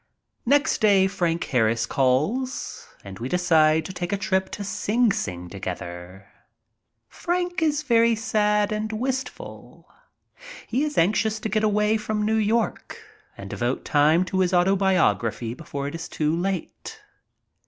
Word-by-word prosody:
Next 285 +4 +3
day 200 -3 +5
Frank 170 -3 -1
Harris 115 -3 +1
calls 155 - -1 0.2
and 95 -1 -10
we 120 +3 -4
decide 160 -3 +3
to 190 - -7
take 175 -1 -4
a 200 - 0
trip 190 -1 -1
to 205 - -6
Sing 215 +3 +1
Sing 90 - -4
together. 90 0 -7 0.8
Frank 355 0 -2
is 305 -1 +1
very 230 -4 +3
sad 210 -3 +1
and 215 +1 -2
wistful. 260 - -5 0.8
He 255 +5 -1
is 300 -1 -3
anxious 215 +5 +2
to 220 - -3
get 215 +1 0
away 210 +1 +2
from 215 0 -2
New 220 +1 +1
York 220 - -1 0.4
and - - -8
devote 120 +2 -3
time 155 +5 +3
to 190 +1 -2
his 185 0 +2
autobiography 180 - +1
before 140 0 -6
it 145 - -6
is 165 -1 -6
too 155 +1 0
late. 185 0 -4
195 Hz, 145 wpm, -24 LUFS, 155-220 Hz, 0.8 s, day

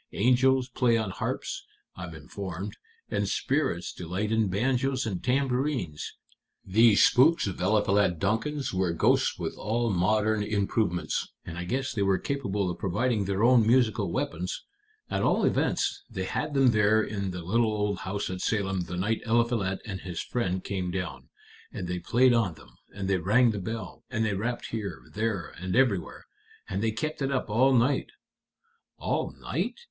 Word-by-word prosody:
Angels 130 +3 +3
play 120 -2 +2
on 110 -3 -2
harps, - - -3 0.3
I'm 90 -3 -7
informed, 95 +6 -6 0.4
and - - 0
spirits 135 - -1
delight 90 +5 -3
in 110 -1 +2
banjos 130 +6 0
and 95 -5 -3
tambourines. 125 - -1 0.5
These 110 +2 +5
spooks 160 +7 +5
of 95 -3 -4
Eliphalet 100 -2 +2
Duncan's 115 - -1
were 95 -2 +1
ghosts 85 - +2
with - - -4
all 115 +2 0
modern 105 +3 +2
improvements, 100 -5 0 0.2
and 85 - -7
I 90 0 -4
guess 130 +6 -2
they 105 - -2
were 95 -1 +3
capable 105 -9 -2
of - - -7
providing 105 +2 0
their 100 +2 0
own 120 -2 +5
musical 115 -6 +3
weapons. 90 +2 -3 0.5
At - - 0
all - - +2
events, - - 0
they - - -4
had 145 - -3
them 135 -3 +5
there 105 0 +4
in 100 -2 -3
the 90 -1 -5
little 110 +5 +2
old 105 -2 -1
house 100 0 -3
at 90 0 -5
Salem 95 -4 0
the 90 +1 -5
night 105 +5 0
Eliphalet 115 -5 +1
and 95 -4 -5
his 90 -3 -5
friend 95 -7 -2
came 95 -3 -3
down. 90 -8 -5 0.4
And 90 - -5
they 90 0 -2
played 125 +8 +4
on 110 -8 +1
them, 65 - -16 0.2
and 95 -1 -5
they 95 -1 +2
rang 115 +7 +4
the 105 - -4
bell, 110 +4 -6
and 115 -3 0
they 105 - 0
rapped 120 +5 -3
here, 100 -7 -4
there, 105 -4 -1
and 95 0 -3
everywhere. 120 -9 +1 0.4
And 95 +1 -2
they 115 - +2
kept 145 +8 -3
it 135 0 0
up 130 -5 -1
all 130 +5 +4
night." 130 +2 +2 0.9
"All - - -2
night?" - - -2
105 Hz, 170 wpm, -28 LUFS, 95-120 Hz, 0.9 s, These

